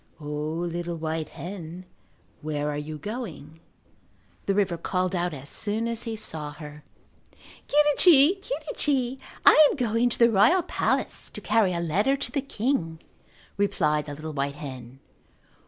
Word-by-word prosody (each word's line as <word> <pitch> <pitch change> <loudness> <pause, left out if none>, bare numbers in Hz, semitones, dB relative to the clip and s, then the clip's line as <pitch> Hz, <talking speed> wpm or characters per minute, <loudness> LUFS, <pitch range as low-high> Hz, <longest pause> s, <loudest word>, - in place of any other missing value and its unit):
"O, 150 - -11
little 165 +3 -3
white 160 -1 -3
hen, 175 +2 -8 0.6
where 150 -1 -2
are - - -4
you 155 +1 -6
going?" 165 - -7 0.9
the 195 - +2
river 195 -4 +1
called 180 +2 -1
out 175 0 0
as 140 -2 -8
soon 220 +7 +2
as 230 -1 -2
he 225 - -3
saw 155 -9 -4
her. 150 0 -11 0.8
"Quirrichi, 300 +4 +5
quirrichi, 270 - -1 0.3
I 310 -1 +8
am - - -2
going 235 -1 +1
to - - -1
the 235 0 +5
royal 225 - +4
palace - - -1
to - - -8
carry 215 -3 +2
a 170 - -2
letter 200 - +1
to 275 - -2
the 280 - -1
king," 215 - -2 0.6
replied 150 -7 +1
the 145 -1 -7
little 155 +1 -7
white 140 0 -2
hen. 130 -3 -9
175 Hz, 150 wpm, -26 LUFS, 150-230 Hz, 0.9 s, I